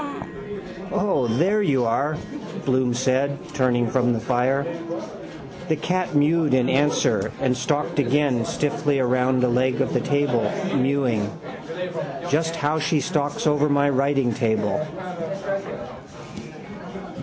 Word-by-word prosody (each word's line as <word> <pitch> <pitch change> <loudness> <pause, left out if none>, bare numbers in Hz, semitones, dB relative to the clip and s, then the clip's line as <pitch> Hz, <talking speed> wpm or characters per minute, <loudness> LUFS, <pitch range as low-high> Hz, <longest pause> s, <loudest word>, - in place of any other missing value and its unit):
—Mkgnao! 205 -8 -9
—O, 180 -12 +1
there 175 - +2
you 135 -10 +2
are, 140 +7 +1 0.2
Mr - - -9
Bloom 130 -2 +2
said, 130 +3 +1 0.2
turning 120 -3 +2
from 125 0 +2
the 115 - -1
fire. 125 +4 +1 1.0
The 160 - +3
cat 180 +2 -1
mewed 150 -1 +3
in 130 0 +2
answer 130 -7 +2
and 130 -2 +1
stalked 145 +4 -1
again 135 -2 +2
stiffly 145 0 0
round 125 0 +2
a - - +4
leg 125 +1 +1
of - - 0
the 125 - +1
table, 145 - +1 0.2
mewing. 130 -6 +1 1.0
Just 165 +3 +1
how 155 0 0
she 155 0 +1
stalks 145 -4 -1
over 150 0 +3
my 145 0 +3
writingtable. 130 -2 +1
140 Hz, 120 wpm, -23 LUFS, 125-150 Hz, 1.0 s, a